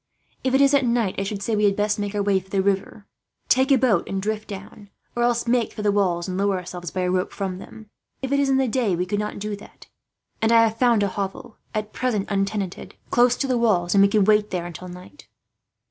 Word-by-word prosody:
"If 260 0 +1
it 270 - +4
is 275 0 +5
at 280 -1 +4
night 235 -5 +1
I - - 0
should 200 0 -4
say 220 +1 0
we 210 0 +2
had 200 -1 +3
best 210 +1 0
make 205 0 -3
for 205 -1 0
the 190 -1 0
river, 200 +1 -1 0.4
take 265 +2 +3
a 270 - +6
boat 230 -9 +2
and 195 - -2
drift 215 +2 -3
down; 200 0 -10 0.3
or 240 - -1
else 240 -1 +1
make 235 -1 +1
for 210 - -6
the 205 - +3
walls, 185 -4 0
and 185 0 -3
lower 200 -1 +1
ourselves 180 -1 -6
by 185 - -3
a 180 0 0
rope 185 0 0
from 190 -2 -4
them. 220 +2 -12 0.4
If 265 - -3
it 280 - +2
is 280 -1 +2
in 265 - +3
the 265 -1 +2
day 225 -6 +1
we 180 +1 -1
could 205 +3 -2
not 210 0 -3
do 210 0 -4
that; 200 - -15 0.6
and 225 +1 +2
I 230 0 +6
have 225 0 0
found 235 -4 +4
a - - +2
hovel, 195 +3 -5 0.2
at 215 0 -3
present 215 -6 -1
untenanted, 195 -1 -2 0.2
close 245 0 +4
to 275 - -2
the 255 -2 +1
walls, 180 -7 +2
and 200 - +5
we 200 - +7
could 200 -1 +2
wait 210 0 +3
there 180 -2 -3
until 175 +1 -8
night." 180 +10 -12
205 Hz, 250 wpm, -23 LUFS, 195-235 Hz, 0.6 s, we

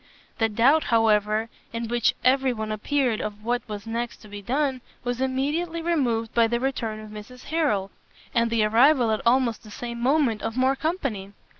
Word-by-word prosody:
The 225 -1 +2
doubt, 265 +9 +3
however, 215 -1 +2 0.2
in 230 0 -4
which 240 0 +1
every 265 0 +3
one 220 -1 -4
appeared 240 +2 0
of 210 0 -6
what 245 +1 0
was 205 -1 -6
next 235 +1 -3
to - - -12
be 205 0 -8
done, 265 +3 -1 0.2
was 245 +1 -2
immediately 295 +6 -1
removed 245 -10 0
by 230 -1 +4
the 235 +1 0
return 235 -4 -2
of 215 -1 -10
Mrs 215 +4 -10
Harrel, 285 -12 0 0.4
and 235 -1 +2
the 230 -2 +2
arrival 240 +3 +4
at 215 - 0
almost 240 -2 +2
the 215 - -14
same 235 +2 -6
moment 255 -4 +2
of 225 +2 -4
more 260 +1 +3
company. 270 - -3
235 Hz, 180 wpm, -25 LUFS, 215-265 Hz, 0.4 s, by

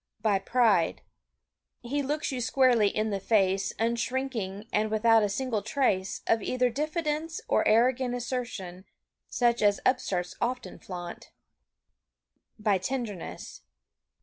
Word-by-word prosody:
By 205 -3 +3
pride. 205 -5 +2 0.8
He 280 +4 -1
looks 295 +2 -2
you 255 -2 -3
squarely 245 -3 +4
in 215 +2 -1
the 200 - -1
face 195 -1 +2
Unshrinking 230 -3 -2
and 215 +1 +1
without 225 +1 +4
a 205 - +1
single 230 0 -1
trace 200 -4 0
Of 225 - +2
either 250 +3 +1
diffidence 310 +3 -2
or - - +2
arrogant 245 +3 +3
Assertion 235 -7 -5 0.4
such 240 -1 +1
as 205 -1 +3
upstarts 190 -9 0
often 250 0 -3
flaunt. 175 -2 -8 1.3
By 210 -3 +1
tenderness. 220 -4 -5
230 Hz, 120 wpm, -28 LUFS, 200-255 Hz, 1.3 s, squarely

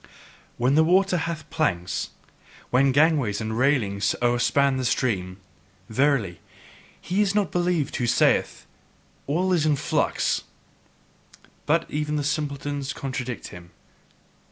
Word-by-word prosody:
When 125 +3 +2
the 160 +2 +5
water 185 +3 +3
hath 165 -2 -3
planks, 90 - -1 0.6
when 135 +2 +4
gangways 140 -7 +2
and 110 0 -3
railings 115 -7 +1
o'erspan 125 +3 +2
the 130 - -2
stream, 95 -7 -1 0.5
verily, 115 - +1 0.6
he 190 +3 -1
is 200 -1 +1
not 200 -7 +1
believed 175 -5 0
who 120 - -1
then 120 - +1
saith: - - +2 0.6
"All 180 +6 +1
is 170 -4 +2
in 155 -1 +3
flux." - - 0 1.3
But 165 +2 +2
even 150 0 -2
the 145 - -1
simpletons 145 -1 -3
contradict 130 -3 -5
him. 85 -1 -12
140 Hz, 125 wpm, -24 LUFS, 120-160 Hz, 1.3 s, the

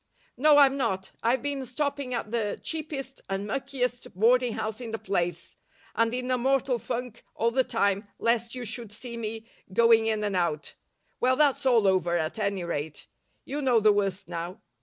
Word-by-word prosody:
"No, 295 +3 +5
I'm 275 -1 +6
not. 190 -8 -1
I've 235 +2 +1
been 285 -2 -2
stopping 280 +1 -2
at 225 -2 -4
the 220 -3 -1
cheapest 285 -4 -4
and 195 +1 -2
muckiest 250 +1 -2
boarding 240 +4 +4
house 220 +2 -4
in 235 - -5
the 225 - -3
place, 175 -4 -2 0.4
and 230 0 +2
in 250 +1 -2
a 255 - +2
mortal 265 -1 +1
funk 240 -1 -5
all 230 +1 +1
the 260 +2 +3
time 200 -3 0
lest 235 +1 0
you 250 -1 -5
should 225 0 -5
see 235 +3 -7
me 225 -1 -5 0.3
going 225 +2 +5
in 215 -1 0
and 205 -2 -1
out. 170 -4 -1 0.5
Well, 255 +1 +3
that's 280 -2 +3
all 235 -5 +5
over, 180 -3 +3
at 160 +5 -2
any 200 -3 -1
rate. 155 -3 -4 0.4
You 290 +2 -3
know 250 -4 +4
the 215 -1 +5
worst 195 -1 -1
now. 175 +4 -5
230 Hz, 180 wpm, -27 LUFS, 200-255 Hz, 0.5 s, I'm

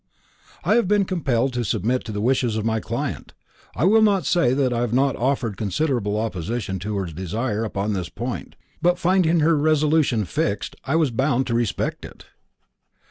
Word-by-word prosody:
"I - - +2
have 235 - +2
been 205 0 +3
compelled 135 -9 0
to 120 -1 -1
submit 115 +4 0
to 110 - -5
the 105 -1 -3
wishes 125 -1 +1
of 110 - -2
my 110 0 +1
client. - - -4 0.4
I - - -1
will 220 +4 +5
not 205 -3 +3
say 170 -8 +3
that 130 -3 +1
I 120 - -1
have 120 -2 -1
not 135 0 +2
offered 125 -5 -1
considerable 105 - -1
opposition 105 -1 -3
to 105 +2 -3
her 95 - -1
desire 105 +7 -3
upon 105 -1 -2
this 90 -3 -3
point, 120 +2 -6 0.3
but 175 +1 +3
finding 175 -2 +2
her 160 +2 +4
resolution 150 -6 +2
fixed, 80 - -2
I 140 - 0
was 160 -5 +2
bound 130 +2 +1
to 120 - -2
respect 115 -3 -1
it." - - -12
120 Hz, 185 wpm, -23 LUFS, 110-155 Hz, 0.4 s, will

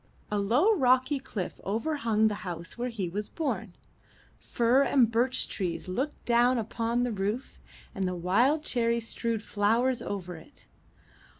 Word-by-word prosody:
A 210 - +1
low, 250 - +3
rocky 260 -3 +3
cliff 205 -8 -6
over 230 +10 -1
hung 220 -4 +2
the 210 -1 -3
house 170 -4 -6
where 245 +1 -3
he 210 -6 -3
was 205 +5 -4
born; 225 - -3 0.6
fir 240 +3 +2
and 255 -5 +3
birch 245 +3 +2
trees 180 -2 -4
looked 260 +11 -3
down 245 +1 +4
upon 230 +2 -1
the 245 - -1
roof, 210 +5 -3 0.3
and 190 -1 -1
the 180 - -2
wild 240 - +2
cherry 235 -4 +1
strewed 230 -1 -3
flowers 230 +5 +1
over 180 -4 -5
it. 160 - -16
230 Hz, 155 wpm, -28 LUFS, 200-250 Hz, 0.6 s, down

